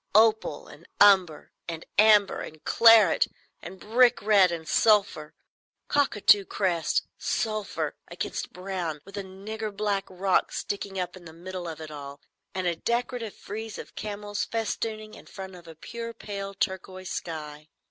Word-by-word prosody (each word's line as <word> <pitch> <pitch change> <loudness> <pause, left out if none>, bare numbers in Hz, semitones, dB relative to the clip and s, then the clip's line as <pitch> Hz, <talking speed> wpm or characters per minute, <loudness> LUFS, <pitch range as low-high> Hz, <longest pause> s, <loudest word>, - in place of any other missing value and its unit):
Opal 220 -8 +3
and 155 +3 -15
umber 190 -6 +5 0.2
and 165 -1 -6
amber 210 -2 +5
and 155 0 -9
claret 225 -6 +6 0.3
and 185 +2 -9
brick 240 +5 +4
red 200 -4 +5
and 165 -2 -5
sulphur—cockatoo 205 - +2
crest—sulphur—against 195 +4 -2
brown, 180 -5 -4
with 195 +1 -11
a 200 - -3
nigger 210 +3 -6
black 200 -1 -1
rock 185 +1 +1
sticking 200 -1 -4
up 180 0 -3
in 180 -2 -13
the 160 - -11
middle 180 +1 -7
of 160 -1 -6
it 155 -1 -8
all, 140 -1 -8 0.4
and 185 -1 -2
a 175 -1 +1
decorative 235 +2 -2
frieze 220 +1 -7
of - - -9
camels 205 0 -4
festooning 220 -1 -3
in - - -13
front 190 -1 -8
of 175 -2 -13
a 165 - -11
pure 230 +7 -7
pale 200 -1 -6
turquoise 185 -1 -3
sky." 155 -2 -6
195 Hz, 140 wpm, -27 LUFS, 170-215 Hz, 0.4 s, claret